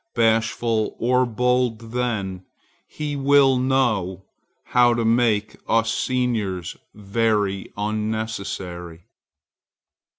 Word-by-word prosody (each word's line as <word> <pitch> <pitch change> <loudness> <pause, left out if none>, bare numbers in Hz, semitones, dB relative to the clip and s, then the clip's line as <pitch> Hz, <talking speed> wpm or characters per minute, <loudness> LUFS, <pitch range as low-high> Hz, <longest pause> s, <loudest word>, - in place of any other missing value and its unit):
Bashful 115 0 +1
or 125 +2 +2
bold 120 -1 0
then, 105 -7 -2 0.4
he 150 -1 -4
will 140 -1 +4
know 110 -8 0 0.4
how 120 -1 +3
to 115 -1 -1
make 110 -2 +1
us 115 0 +2
seniors 110 -9 -1 0.2
very 105 -1 -1
unnecessary. 105 -5 -4
115 Hz, 80 wpm, -22 LUFS, 105-125 Hz, 0.4 s, will